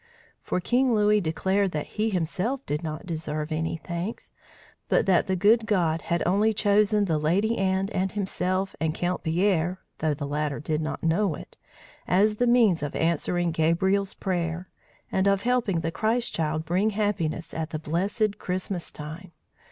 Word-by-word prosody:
For - - -1
King 245 +5 +2
Louis 210 0 +4
declared 190 +4 0
that 150 -1 -2
he 220 +1 -1
himself 195 - -1
did 150 +1 -2
not 155 +3 -5
deserve 155 -2 -3
any 160 +1 -1
thanks, 170 +6 -5 0.6
but - - +3
that 185 -3 +3
the 190 - +1
good 220 +5 +4
God 165 -5 +1
had 170 0 -1
only 205 +5 +3
chosen 210 0 +3
the 160 -5 0
Lady 195 +9 +1
Anne 190 0 +1
and 190 -2 -1
himself 190 -1 -1
and 160 0 -1
Count 180 +1 -1
Pierre 175 +1 +1 0.2
(though 155 -1 +1
the 145 0 -4
latter 145 0 -2
did 155 +1 -1
not 155 - -4
know 165 +1 +2
it) - - -12 0.5
as 210 +4 +3
the 245 - +2
means 230 -9 +4
of 145 -1 -4
answering 170 +1 +1
Gabriel's 190 +5 +1
prayer, 175 -2 -2 0.4
and 190 +1 +2
of 200 0 +2
helping 235 -8 +1
the 165 +1 -2
Christ 230 +6 0
child 155 -1 -1
bring 185 +6 +2
happiness 185 -6 -1
at 160 0 -3
the 155 - -3
blessed 200 +7 -1
Christmas 185 -1 -3
time. 160 +4 -9
180 Hz, 165 wpm, -26 LUFS, 160-205 Hz, 0.6 s, Louis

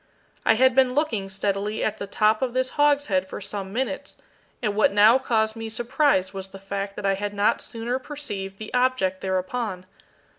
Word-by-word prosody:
I 225 - +6
had 260 +2 +4
been 260 0 +3
looking 230 -10 0
steadily 200 +2 -1
at 215 0 -1
the 200 - -4
top 215 +2 +2
of 255 -2 -1
this 255 0 +1
hogshead 285 -11 +2
for - - -7
some 195 -1 -5
minutes, 255 +4 -3 0.4
and 210 -4 -1
what 215 - +4
now 215 +5 +6
caused 220 -4 +1
me 225 0 -5
surprise 235 -3 +1
was 195 -1 -6
the 195 - -11
fact 195 +1 -5
that 210 - -5
I 195 - +3
had 205 +1 -4
not 205 +1 +2
sooner 235 +2 -3
perceived 205 -10 -6
the 215 0 -8
object 250 -7 +1
thereupon. 190 +1 -2
215 Hz, 185 wpm, -24 LUFS, 195-250 Hz, 0.4 s, I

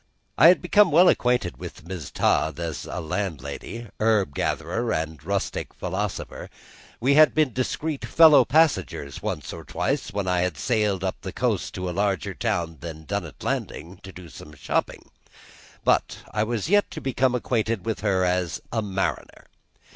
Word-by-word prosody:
I 155 - +7
had 180 +1 +5
become 205 +2 +5
well 175 +4 +6
acquainted 125 -7 +1
with - - -9
Mrs. 85 -4 -7
Todd 75 +1 +1
as 85 -3 -4
landlady, 90 - -4
herb 110 -8 +2
gatherer, 115 - -1
and 80 -2 -3
rustic - - -3
philosopher; - - -4 0.5
we 135 +4 +3
had 155 +1 +6
been 155 -6 +2
discreet 140 +4 -2
fellow 160 -3 +7
passengers 95 - +1
once - - -4
or - - -8
twice - - -2
when 100 -1 -3
I 90 -1 +2
had 90 -4 -1
sailed 105 -6 0
up 95 - -3
the - - -6
coast - - -1
to 90 0 -3
a - - -2
larger 95 -2 -1
town 85 -2 -2
than 80 -2 -8
Dunnet - - -5
Landing 85 +5 -4
to 95 - -10
do 90 -1 -11
some 75 -1 -12
shopping; 65 - -3 0.7
but - - +2
I 105 - 0
was 115 +1 -2
yet 205 +3 +3
to - - -7
become 130 -1 +1
acquainted 115 -4 -1
with 110 -1 -2
her 95 -3 +1
as 90 -2 0
a 115 - 0
mariner. 95 -2 -3
100 Hz, 160 wpm, -24 LUFS, 85-125 Hz, 0.7 s, I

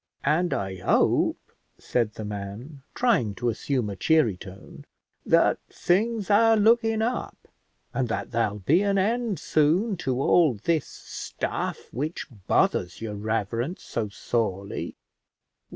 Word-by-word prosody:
And 165 +5 +2
I 95 -1 -2
hope," 90 - +1 0.3
said 115 -4 -1
the 110 - -6
man, 105 +8 -7
trying 205 - +2
to 120 +2 -1
assume 125 +1 -1
a 100 - -4
cheery 120 - +3
tone, 95 +1 -12 0.4
"that - - +4
things 210 +3 0
are 225 +2 +5
looking 225 0 +3
up, 245 +2 -3 0.5
and 130 -2 0
that 115 - -3
there'll 115 -3 0
be 145 - +3
an 200 -1 +1
end 220 +1 0
soon 160 +9 +2
to 130 -6 -2
all 155 -2 +4
this 155 +9 0
stuff - - -5
which 150 +7 -3 0.2
bothers 90 -1 +1
your 110 -2 -5
reverence 115 - -2
so 110 -3 -3
sorely." 100 -2 -3
135 Hz, 130 wpm, -26 LUFS, -, 0.5 s, are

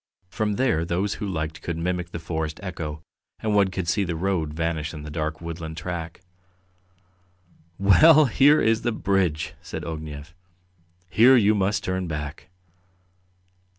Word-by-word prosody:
From 105 +3 -1
there 120 -8 +1
those 90 +4 -1
who 105 - -2
liked 80 -4 -4
could 85 -1 -4
mimic 90 0 -2
the 85 - -6
forest 80 -2 -4
echo, 80 -5 -5 0.4
and 110 -1 -1
one 100 -1 +4
could 95 -2 -4
see 100 +5 +1
the 85 -3 -3
road 85 -3 -1
vanish 80 0 -2
in 75 - -8
the 75 - -8
dark 80 +1 -3
woodland 80 -1 -6
track. 85 0 -5 1.6
"Well, 150 - +6
here 140 +5 +5
is 115 0 +2
the 120 - 0
bridge!" 95 -7 0
said - - -7
Ognev. 80 0 -7 0.7
"Here 125 +7 +6
you 105 -2 +4
must 100 +1 0
turn 95 -1 -2
back." 75 0 -6
85 Hz, 150 wpm, -24 LUFS, 80-100 Hz, 1.6 s, Well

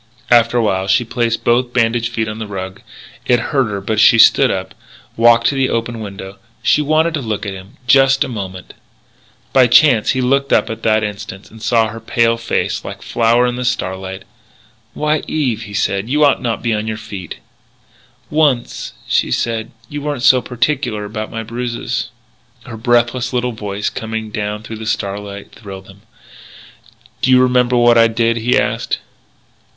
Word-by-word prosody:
After 120 0 +4
a 120 - +2
while 95 -3 0
she 95 +5 +3
placed 115 -1 -1
both 120 +1 +1
bandaged 115 -1 +1
feet 110 -1 -2
on 110 +1 -6
the 110 - -5
rug. 95 -2 -6 0.5
It 120 -1 +4
hurt 135 0 0
her, 100 -1 -3
but 105 +2 -2
she 110 +2 +6
stood - - +6
up, - - -3 0.4
walked 115 0 +5
to 140 - -3
the 135 -1 +1
open 115 0 -2
window. 100 -2 -8 0.2
She - - +3
wanted 155 +3 +1
to 155 - -2
look 110 -3 -3
at 100 - -4
him 95 +2 -12
just 135 +2 +4
a - - -4
moment 95 -6 -7 0.8
By 130 -2 +6
chance 120 -2 +5
he - - +1
looked 135 +2 +1
up - - +2
at 110 0 -6
that 110 -1 +2
instant, 105 -1 -7
and 110 0 -14
saw 115 0 +2
her 115 +1 -8
pale 115 +1 +1
face, 115 - -2
like - - -7
a - - -25
flower 120 +1 +2
in 125 0 -2
the 125 - -3
starlight. 95 -5 -3 0.7
"Why, 150 0 0
Eve," 125 -8 -1
he 105 - -10
said, 100 +2 -1
"you 150 +2 +3
ought 140 - +2
not 120 -2 -1
to - - -15
be 115 -2 +1
on 105 0 -2
your 110 -1 -3
feet." 100 -5 -8 1.0
"Once," 145 -6 0
she - - +1
said, 115 -1 -2 0.2
"you 145 +3 -6
weren't 145 -4 -3
so 130 -1 +6
particular 120 -3 -2
about 110 +1 -5
my 115 0 -5
bruises." 120 +1 -4 0.5
Her 120 - -9
breathless 120 +2 +1
little 125 0 0
voice 100 -2 -4
coming 110 -1 -5
down 105 0 -4
through 110 0 -7
the 110 0 -7
starlight 100 -1 -4
thrilled 95 -2 -11
him. 95 +1 -16 1.2
"Do - - +1
you 130 0 +6
remember 125 -1 +3
what 120 -1 +5
I 115 - +6
did?" 115 +1 0
he 115 +2 +1
asked. - - -1
115 Hz, 185 wpm, -17 LUFS, 105-125 Hz, 1.2 s, she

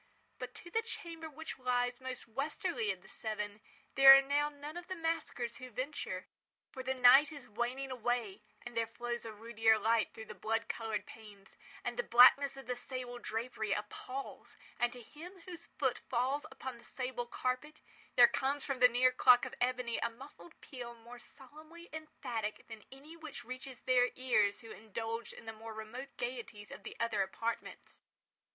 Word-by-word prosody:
But - - -6
to 345 - -11
the 450 - +2
chamber 340 -8 -6
which 315 -1 -7
lies 245 0 0
most 260 -1 -6
westwardly 295 - -2
of - - -3
the - - -15
seven, 210 -1 -4 0.3
there 270 0 +11
are - - +5
now 290 +2 +2
none 295 +2 -9
of 350 0 -7
the 375 - -3
maskers 325 -7 -2
who 255 -2 -8
venture; 255 +6 -4 0.5
for 265 - -6
the 260 +1 -1
night 260 +4 +8
is 285 -4 -9
waning 245 +4 -2
away; 240 -4 -1 0.2
and 240 -1 -8
there 230 0 +1
flows 240 +1 -4
a 225 - -5
ruddier 225 0 +3
light 225 +1 +2
through 220 - -9
the - - -8
blood 225 +1 -1
coloured 225 -2 -3
panes; 205 -3 -13 0.3
and - - -3
the - - +2
blackness 270 - +7
of 270 - -9
the 250 +1 -2
sable 245 -1 -5
drapery 220 -2 -2
appals; 255 +6 -6 0.2
and 240 0 +2
to 245 -1 -10
him 350 - -11
whose 350 -3 -8
foot 260 -3 -1
falls 265 +5 0
upon 260 -2 -7
the - - -17
sable 250 -2 -4
carpet, 255 +6 -2 0.4
there 240 -1 +10
comes 275 +3 -1
from 275 -2 -2
the 250 - +9
near 250 +1 +4
clock 250 -1 +6
of - - -7
ebony 250 -1 0
a 235 - 0
muffled 275 +7 -13
peal 245 -4 -8
more 235 +1 -12
solemnly 310 +7 -13
emphatic 240 -9 -4
than 225 -2 -10
any 285 +5 -12
which 315 -3 -9
reaches 255 0 -7
their 250 -1 +4
ears 215 -6 +2
who 225 -2 -11
indulged 225 +1 -5
in - - -12
the 225 - -5
more 220 0 -9
remote 240 +5 -7
gaieties 235 -4 -5
of - - -9
the - - -9
other 230 -3 +1
apartments. 225 +4 -4
250 Hz, 180 wpm, -34 LUFS, 230-275 Hz, 0.5 s, there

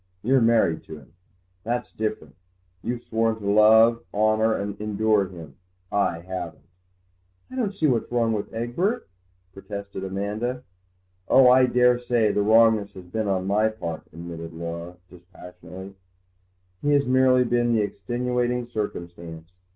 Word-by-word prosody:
You're 130 +3 +3
married 115 -8 +3
to 80 - -9
him—that's 90 - -8
different; 105 -9 -4 0.5
you've 120 0 -4
sworn 115 0 0
to 105 -2 -6
love, 110 +3 +5
honour, 110 +1 +2
and 100 0 -4
endure 105 -1 +1
him: 80 -6 -12 0.3
I 90 -4 0
haven't." 95 +1 -7 0.9
"I - - -8
don't 235 -6 -1
see 160 - 0
what's 120 -6 +1
wrong 115 -2 +1
with 105 -2 -4
Egbert," 120 - -2 0.5
protested 100 0 -7
Amanda. 105 +6 -3 0.6
"Oh, 130 -1 +6
I 130 0 +6
daresay 125 -3 +2
the 105 - 0
wrongness 110 -1 +4
has 95 -1 -11
been 105 +4 -3
on 95 -1 0
my 105 +3 +2
part," 85 -7 -6
admitted 85 0 -8
Laura 85 +1 -6
dispassionately; 90 +1 -12 0.9
"he 145 0 +2
has 140 -1 +3
merely 130 0 +4
been 120 -1 +1
the 110 -2 +2
extenuating 120 +4 -2
circumstance. 85 -7 -6
110 Hz, 135 wpm, -24 LUFS, 90-120 Hz, 0.9 s, Oh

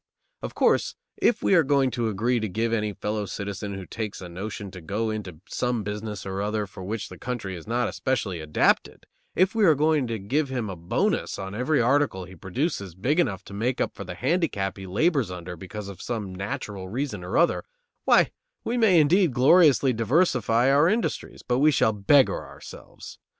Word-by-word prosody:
Of - - -6
course, - - +2 0.2
if 240 - +2
we - - +3
are 175 - +7
going 140 -3 +2
to 120 -2 -1
agree 115 +4 0
to 110 -1 -3
give 115 +4 -1
any 105 -2 0
fellow 105 +1 -3
citizen 100 +1 -5
who 95 -1 -7
takes 110 0 -5
a 95 - -8
notion 100 +2 -6
to 90 - -10
go 105 +7 -2
into 95 -7 -6
some 125 -3 -1
business 105 0 -5
or 95 0 -3
other 105 +1 -1
for 95 -1 -10
which 105 +3 -4
the - - -11
country 115 -7 -4
is 85 - -10
not 120 +2 0
especially 110 -9 -2
adapted, 80 -1 +1 0.3
if 185 +2 +3
we 225 -1 +2
are 160 -6 +6
going 150 -2 +2
to 115 -1 -2
give 135 +9 -1
him 120 -6 -3
a - - -6
bonus 85 0 -1
on 95 0 -6
every 125 +7 +1
article 125 -6 +2
he 95 +1 -13
produces 100 - -3
big 130 - 0
enough 100 - 0
to 100 - -12
make 120 +5 -1
up - - -1
for - - -7
the - - -7
handicap 130 - 0
he 95 -1 -9
labors 135 - +1
under 90 -1 -7
because 95 +4 -8
of 100 -2 -9
some 105 -6 -4
natural 95 0 -5
reason 115 -4 -3
or 90 - -2
other, 170 - +3 0.4
why, - - +5 0.3
we 240 +2 -1
may 195 -7 +5
indeed 170 +3 +4
gloriously 140 0 +5
diversify 120 - +2
our 145 +5 +5
industries, 225 +4 -2
but 125 0 0
we 150 +2 +5
shall 115 -6 +3
beggar 125 +7 +3
ourselves. - - -12
110 Hz, 195 wpm, -25 LUFS, 95-140 Hz, 0.4 s, are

